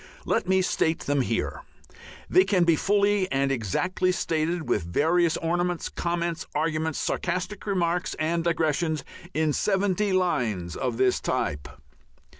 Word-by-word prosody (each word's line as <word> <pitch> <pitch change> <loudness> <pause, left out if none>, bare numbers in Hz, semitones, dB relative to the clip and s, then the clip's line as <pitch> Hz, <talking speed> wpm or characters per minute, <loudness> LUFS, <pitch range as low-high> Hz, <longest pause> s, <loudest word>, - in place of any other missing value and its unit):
Let - - 0
me 190 0 +3
state 160 -2 0
them 145 -1 +1
here; 125 - -2 0.7
they 370 - +5
can 185 - +2
be 170 -1 +4
fully 200 +1 +2
and 135 0 +1
exactly 180 - 0
stated, 165 -1 -1
with - - +1
various 160 - +2
ornaments, 175 +1 -1
comments, 170 -1 -2
arguments, 160 -1 0
sarcastic 185 +4 -2
remarks, 180 -2 0
and 165 +2 0
digressions, 160 -2 0 0.3
in 155 -1 +2
seventy 200 +2 +1
lines 120 - 0
of 125 -3 -2
this 130 0 +2
type. 70 -1 -2
170 Hz, 130 wpm, -26 LUFS, 150-185 Hz, 0.7 s, they